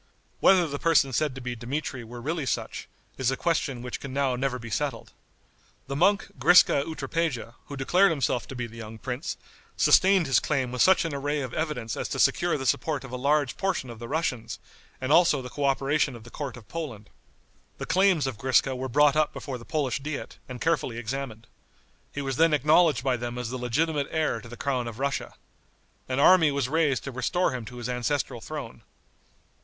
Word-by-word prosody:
Whether 185 -2 +5
the 145 -2 -4
person 150 -5 +3
said 150 0 0
to 130 - -7
be 125 -1 -4
Dmitri 125 +1 -4
were 120 +2 -9
really 155 +1 -2
such, - - -3 0.3
is 130 -2 +2
a 135 - -1
question 140 -7 -1
which 125 - -5
can 140 - -7
now 135 -1 0
never 130 0 -1
be 115 -2 -9
settled. 135 -5 -3 0.7
The 140 - -5
monk 200 +8 +2
Griska 175 -5 +6
Utropeja, 145 -5 -2
who 140 - -7
declared 180 +9 +4
himself 135 -6 -1
to 135 - -8
be 125 -1 -3
the 115 0 -11
young 110 0 -8
prince, 130 +7 -4 0.4
sustained 190 -2 +5
his 135 -4 +4
claim 135 -5 -1
with 125 - -1
such 190 -2 +5
an 165 - -3
array 145 +1 -1
of 130 -3 -5
evidence 150 -9 -2
as - - -4
to - - -3
secure 175 -2 +3
the 135 - -5
support 145 +4 0
of 135 - -10
a - - -4
large 140 0 +1
portion 185 -10 -2
of 115 - -11
the 120 - -7
Russians, 125 -7 -2 0.4
and 130 +1 -2
also 165 -3 +5
the 125 -1 -8
coöperation 140 0 +1
of 115 - -11
the 120 - -13
court 135 -4 -5
of 115 - -14
Poland. 135 -11 -6 0.7
The - - -5
claims 185 -3 +3
of 130 -5 -4
Griska 130 0 +2
were 130 +1 -4
brought 145 +2 +4
up 155 -1 +2
before 130 -3 -6
the 115 - -12
Polish 140 -5 -1
diet 145 +1 -6
and 125 -1 -7
carefully 155 -7 0
examined. 120 -1 -5 0.7
He 140 - -4
was 135 -2 -3
then 165 -1 +5
acknowledged 150 -1 +4
by 130 -2 +1
them 120 0 -5
as 125 -1 -4
the 130 - -4
legitimate 145 +4 0
heir 155 -8 -1
to 115 - -12
the 120 - -9
crown 125 -2 -1
of 115 -1 -7
Russia. 140 +1 -2 0.7
An 130 +1 -1
army 165 +1 +6
was 140 -3 -1
raised 150 -2 +1
to 140 - -5
restore 125 +8 0
him 125 -3 -5
to 125 - -10
his 120 -1 -4
ancestral 125 0 -2
throne. 140 -6 -7
135 Hz, 205 wpm, -26 LUFS, 125-155 Hz, 0.7 s, Griska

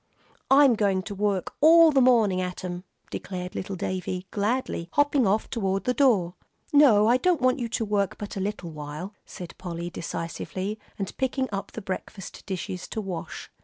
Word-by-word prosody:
"I'm 275 -1 +7
going 200 -4 +1
to 205 - -6
work 200 -2 -1
all 325 +1 +8
the 275 -2 +4
morning 225 -7 +4
at 180 0 -5
'em," 180 +1 -5 0.3
declared 180 -1 -5
little 190 +1 -4
Davie, 185 0 -3
gladly, 210 -5 -1
hopping 290 -5 +3
off 210 +3 +1
toward 195 -5 -1
the 250 - +1
door. 215 -11 +3 0.4
"No, 240 -8 +6
I 240 +2 +5
don't 350 +4 +2
want 255 +1 +2
you 235 -2 -3
to 225 0 -1
work 200 -2 0
but 205 - -7
a - - -3
little 195 -3 -4
while," 150 +6 -7
said 175 -2 -9
Polly, 175 -1 -5
decisively, 185 +5 -5 0.2
and 195 -1 -4
picking 265 0 0
up 195 -1 -5
the 225 - -7
breakfast 190 0 -6
dishes 185 -1 -4
to 220 - -5
wash. 185 -5 -6
200 Hz, 175 wpm, -26 LUFS, 185-245 Hz, 0.4 s, all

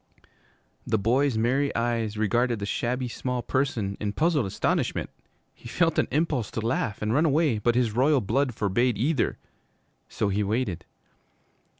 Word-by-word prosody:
The 110 - +2
boy's 120 +4 +1
merry 130 +5 +1
eyes 115 -2 -1
regarded 120 +3 +1
the 100 - -4
shabby 125 +5 -2
small 125 0 -3
person 115 -7 -1
in 105 -1 -2
puzzled 155 - +1
astonishment. 95 - -1 0.4
He - - -13
felt 165 +3 +1
an - - +2
impulse 145 -7 0
to - - +2
laugh 115 -2 -2
and 105 +1 0
run 150 +5 +3
away, 145 -6 +2
but 120 +3 +1
his 120 -3 +2
royal 140 +3 +4
blood 125 +3 0
forbade 110 +4 +1
either. 135 +3 0 0.7
So 105 - -1
he 100 +1 0
waited. 100 -5 -2
120 Hz, 155 wpm, -26 LUFS, 110-135 Hz, 0.7 s, royal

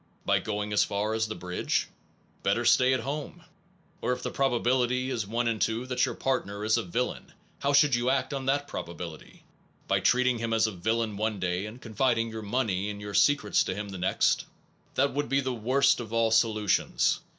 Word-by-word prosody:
By - - +3
going 105 0 -3
as 105 - +4
far 105 +1 -1
as 110 0 0
the 110 - -5
bridge? 90 0 -1 0.5
Better 120 - +1
stay 125 +2 +5
at 130 -2 +1
home! 150 +6 -5 0.6
Or 125 - +1
if - - -6
the - - -3
probability 125 0 +1
is 115 -6 -2
1 115 0 -1
2 115 +4 0
that 125 -1 +1
your - - -4
partner 105 -6 -2
is 110 - +3
a - - +1
villain, 120 +8 -3 0.3
how 140 - +1
should 145 -1 +5
you 120 +1 +2
act 130 +1 0
on 135 -1 -4
that 145 +1 +1
probability? 85 - -8 0.4
By - - +2
treating 125 -1 +2
him 115 0 -2
as 110 0 +3
a 110 - -1
villain 110 +3 -1
one 110 -1 -1
day, 95 +2 -1
and 115 +4 -10
confiding 115 0 0
your 110 0 -6
money 105 -3 -1
and 100 0 -6
your 105 0 -7
secrets 140 -3 +3
to 95 - -2
him 105 0 -5
the 95 -2 -7
next? 90 - +1 0.5
That 140 +1 +2
would 145 -4 -2
be 135 +1 +2
the 130 -2 -2
worst 130 +4 +2
of 115 -3 -7
all 115 -1 +2
solutions. 110 -4 +2
115 Hz, 200 wpm, -28 LUFS, 105-130 Hz, 0.6 s, stay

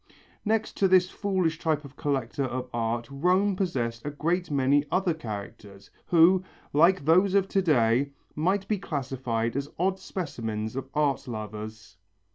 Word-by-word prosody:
Next 220 0 0
to 195 - +4
this 185 -1 +4
foolish 185 -5 -1
type 155 -3 0
of 140 0 -12
collector 135 -2 -1
of 125 0 -4
art 115 0 -1
Rome 185 +7 +2
possessed 120 -12 -2
a 145 - -3
great 165 +4 -1
many 140 0 +3
other 185 -2 +2
characters, 100 -6 -8 0.2
who, 175 +2 +5 0.3
like 170 +2 +4
those 185 +5 +4
of 195 -1 +3
to 195 - +2
day, 130 -5 +3 0.3
might 190 +6 0
be 210 -2 0
classified 125 -8 -2
as 140 +1 -2
odd 190 +2 0
specimens 115 - -4
of 135 0 -5
art 145 -3 +1
lovers. 110 -3 -7
145 Hz, 150 wpm, -27 LUFS, 120-185 Hz, 0.3 s, who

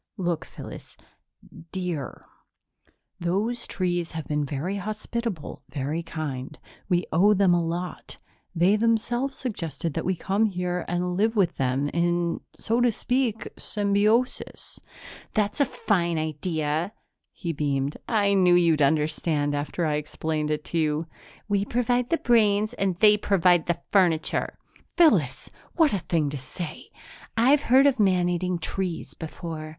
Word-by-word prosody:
"Look, 175 -4 -1
Phyllis - - -11 0.7
dear 180 -7 -4 0.9
those 205 +8 -1
trees 175 -3 -1
have 160 -1 -4
been 150 0 0
very 150 +8 -3
hospitable, 215 -2 -4
very 145 +4 -2
kind. 150 -4 -5 0.3
We 175 -1 +2
owe 200 +6 +5
them 190 -2 +4
a 175 -1 +2
lot. 175 +2 -5 0.4
They 180 +5 +4
themselves 240 +4 0
suggested 165 - -4
that - - -2
we 185 - 0
come 195 +5 +1
here 180 -2 -2
and 180 0 -1
live 220 +4 +1
with 185 -5 +2
them 135 +2 0
in, 170 0 0 0.2
so 230 +2 0
to 245 -1 +4
speak, 245 -1 -1
symbiosis." 210 +4 0 0.6
"That's 210 +3 0
a 285 - +5
fine 175 -9 0
idea!" 155 +2 -2 0.4
He 170 -3 -4
beamed. 140 -1 -1
"I 205 -3 +2
knew 180 -2 +5
you'd 165 -3 +4
understand 150 0 +1
after 145 +4 -2
I 155 - +1
had 150 - +1
explained 155 0 -3
it 150 0 -1
to 170 - -1
you." 155 0 0 0.4
"We 200 -1 +1
provide 245 +2 0
the 335 - +2
brains 215 -3 +3
and 195 -6 0
they 210 +3 +6
provide 180 -4 +3
the 175 - 0
furniture." 175 -5 +2 0.4
"Phyllis! 190 - +3 0.2
What 320 -7 +4
a 200 - +1
thing 160 -4 0
to 145 - -4
say!" 155 +5 -7 0.5
"I've 270 +5 +5
heard 265 0 +5
of 270 -4 +3
man 185 -3 +3
eating 180 0 -1
trees 175 0 -3
before. 160 -1 -7
180 Hz, 145 wpm, -26 LUFS, 160-210 Hz, 0.9 s, they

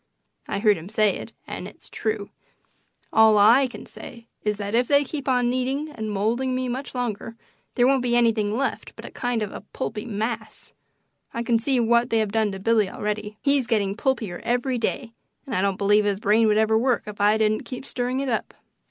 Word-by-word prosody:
I - - -2
heard 210 0 +3
him 170 +4 -10
say 215 -1 +2
it - - -8
and - - -6
it's - - -12
true. 215 -2 -3 0.8
All 220 -1 +6
I 235 +6 +6
can 245 - -10
say 235 -2 -11 0.2
is 210 -1 -1
that 205 0 -4
if 245 +1 +2
they 285 0 +4
keep 280 0 -6
on 250 -2 +2
kneading 265 +4 -2
and 220 -6 -5
moulding 230 +6 0
me 255 0 -1
much 260 +2 -5
longer 230 -2 -3 0.4
there 245 - +4
won't 265 0 +3
be 240 -1 +1
anything 225 -3 +2
left 275 - -3
but - - -10
a - - -8
kind 245 -3 -1
of 205 - -5
a - - -8
pulpy 210 -1 -4
mass. 220 +1 -4 0.6
I 235 - -1
can 235 -1 +2
see 260 +2 +1
what 235 +1 +3
they 225 - +2
have 215 -2 0
done 220 -1 +1
to 195 - -6
Billy 215 -1 +2
already; 210 +1 -4
he's 280 -3 +3
getting 205 -4 +1
pulpier 230 -7 -2
every 245 +1 0
day, 230 0 -2 0.3
and 265 - -6
I 185 - +1
don't 195 -1 0
believe 205 +1 +3
his 200 -1 0
brain 220 +2 +3
would 210 0 +3
ever 220 0 +3
work 250 0 +1
if 210 -1 -7
I 210 +1 +4
didn't 215 0 +1
keep 255 +1 -7
stirring 250 0 -2
it 275 - -3
up. 230 -3 -2
225 Hz, 215 wpm, -24 LUFS, 210-250 Hz, 0.8 s, All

